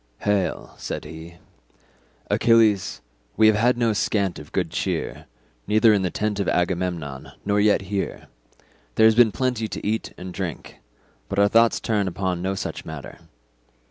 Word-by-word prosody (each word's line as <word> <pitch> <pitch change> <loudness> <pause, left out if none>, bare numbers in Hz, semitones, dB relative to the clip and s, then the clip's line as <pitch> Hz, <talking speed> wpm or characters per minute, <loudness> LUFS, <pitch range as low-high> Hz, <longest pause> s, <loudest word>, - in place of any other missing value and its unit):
"Hail," 105 -2 -1
said - - -5
he, 80 +1 -10 1.0
"Achilles, 110 -4 +3 0.4
we 110 - +5
have 110 -1 +6
had 120 +3 +2
no 115 -2 +2
scant 100 -3 0
of 75 - -12
good - - -1
cheer, - - -3 0.4
neither 110 +1 +5
in 100 - +2
the 90 - 0
tent 105 +2 -2
of 100 - 0
Agamemnon, 90 -6 -2
nor 100 0 +2
yet 105 -1 +3
here; 95 +1 -4 0.7
there 110 - +5
has 110 - +7
been 115 -1 +5
plenty 125 -2 -1
to - - -7
eat 110 +1 -2
and 90 0 -8
drink, 90 -5 -6 0.5
but - - -4
our 100 0 +5
thought 115 +2 +4
turns 105 -3 0
upon 90 0 -2
no 95 +1 -1
such - - -5
matter. 80 -3 -9
100 Hz, 160 wpm, -23 LUFS, 90-110 Hz, 1.0 s, has